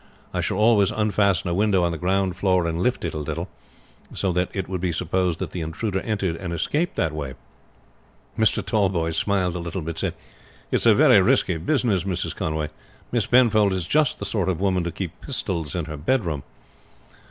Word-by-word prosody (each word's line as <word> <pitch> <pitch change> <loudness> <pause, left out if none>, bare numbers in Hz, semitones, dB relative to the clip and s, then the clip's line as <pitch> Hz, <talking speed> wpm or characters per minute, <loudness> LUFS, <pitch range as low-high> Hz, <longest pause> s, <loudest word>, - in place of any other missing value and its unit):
I - - 0
shall - - -1
always 105 -2 +4
unfasten 100 -4 +1
a - - 0
window 100 -1 +2
on 85 - +1
the 85 - -3
ground 95 +1 0
floor 90 -2 +2
and 85 +1 -1
lift 125 -2 0
it 85 - -3
a 75 - -3
little, 75 - -4 0.7
so 95 - 0
that 90 +1 0
it 95 -3 -3
would 95 -2 -4
be 90 -1 0
supposed 90 +1 0
that - - -5
the 90 - -4
intruder 95 +5 -2
entered 100 -6 -2
and 90 0 -5
escaped 150 - -1
that 80 - 0
way." 70 -4 -5 1.0
Mr. 110 -1 +2
Tallboys 90 -7 +1
smiled 90 0 +1
a - - -2
little, 85 +1 -4
but 80 +1 -5
said, - - -2 0.6
"It - - +3
is - - -2
a - - +7
very - - +6
risky 85 - +2
business, 100 - +1
Mrs. 95 -3 -2
Conway. 80 -1 -2 0.4
Miss 120 -4 +1
Penfold 110 -5 +4
is 90 -3 -2
just 150 - +2
the - - -5
sort 100 -4 0
of 90 -3 -1
woman 95 -2 +1
to 85 - -2
keep 90 0 -6
pistols 90 - -3
in 85 -3 -2
her 75 -1 -6
bedroom." 85 - 0
90 Hz, 200 wpm, -23 LUFS, 85-100 Hz, 1.0 s, a